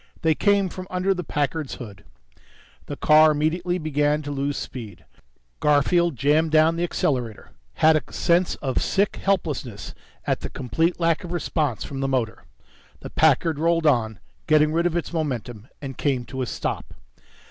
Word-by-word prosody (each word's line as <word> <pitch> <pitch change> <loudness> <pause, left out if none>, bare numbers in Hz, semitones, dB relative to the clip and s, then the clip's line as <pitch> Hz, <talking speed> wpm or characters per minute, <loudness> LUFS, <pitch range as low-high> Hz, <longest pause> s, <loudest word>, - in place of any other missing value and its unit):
They 160 -1 +4
came 200 +3 +2
from 185 +1 -8
under 185 +2 +1
the 180 -1 -5
Packard's 150 -1 -2
hood. 105 -6 -10 0.8
The - - -5
car 155 +1 +6
immediately 170 +4 0
began 150 -2 0
to 145 - -5
lose 140 0 -2
speed. 110 -7 -8 0.5
Garfield 150 +3 +2
jammed 150 +5 +2
down 160 +1 +4
the 170 - -1
accelerator, 125 -9 -2 0.2
had 160 0 +5
a 155 - -2
sense 175 +1 +1
of 130 -2 0
sick 200 +1 0
helplessness 150 - -2 0.3
at - - 0
the - - -6
complete 160 +9 -1
lack 165 0 +1
of 175 - -7
response 150 -7 -1
from 135 - -6
the 135 - 0
motor. 125 -5 -2 0.6
The - - -8
Packard 160 0 +2
rolled 165 0 +1
on, 115 -7 +2 0.3
getting 155 0 +4
rid 170 +2 +2
of 175 0 -1
its 175 - -4
momentum, 120 -8 -4 0.2
and 135 -2 -6
came 130 -4 0
to 130 +3 -6
a 125 - -2
stop. - - -4
155 Hz, 165 wpm, -23 LUFS, 135-170 Hz, 0.8 s, car